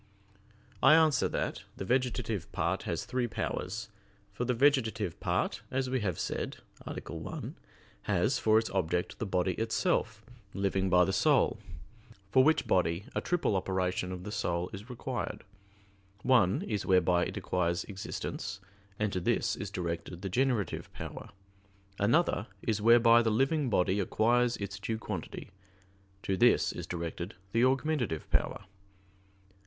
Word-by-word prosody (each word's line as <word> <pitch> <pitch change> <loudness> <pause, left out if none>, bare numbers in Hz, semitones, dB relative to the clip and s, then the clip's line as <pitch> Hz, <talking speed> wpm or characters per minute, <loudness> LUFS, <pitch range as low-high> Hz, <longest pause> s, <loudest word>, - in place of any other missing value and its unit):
I 150 +3 +8
answer 160 -4 +4
that, - - -2 0.2
The 95 - -4
vegetative 120 -5 -1
part - - -1
has - - -2
three 125 -1 -1
powers. 110 -1 -4 0.4
For 120 +5 -2
the 125 0 +1
vegetative 115 - +2
part, - - -1
as 130 -1 -1
we 130 - +1
have 95 -7 -2
said - - -3 0.3
(A. - - -4
1), - - -6 0.5
has - - +2
for 110 0 +4
its 110 0 0
object 90 -2 -1
the 110 - -2
body 90 -1 +1
itself, 115 -2 0 0.3
living 95 -1 0
by 90 0 +5
the 95 - -1
soul; 90 - +3 0.7
for 130 - +6
which 155 +2 +3
body 90 +1 +1
a - - -1
triple 175 - 0
operation 95 -1 -1
of 90 -1 -6
the 105 - -6
soul 90 -4 -2
is 100 +6 -8
required. 125 0 -4 0.8
One 120 -8 +4
is 105 -3 -2
whereby 90 -2 +3
it - - -5
acquires 85 -1 0
existence, 95 0 -5 0.4
and 105 -1 -1
to 90 - 0
this 85 - +1
is - - -5
directed 85 +1 -4
the 95 - -2
generative 125 0 0
power. - - -7 0.7
Another 115 0 +2 0.2
is 110 -2 0
whereby 115 +1 +7
the 115 - +1
living 135 +5 +1
body 95 -1 +2
acquires 120 +5 +2
its 100 0 -5
due 110 +2 -2
quantity; 110 - -6 0.7
to 95 - 0
this 120 +5 +4
is - - -7
directed 85 +2 -5 0.2
the 115 +2 +2
augmentative 130 - +1
power. 100 - 0
105 Hz, 145 wpm, -31 LUFS, 90-125 Hz, 0.8 s, I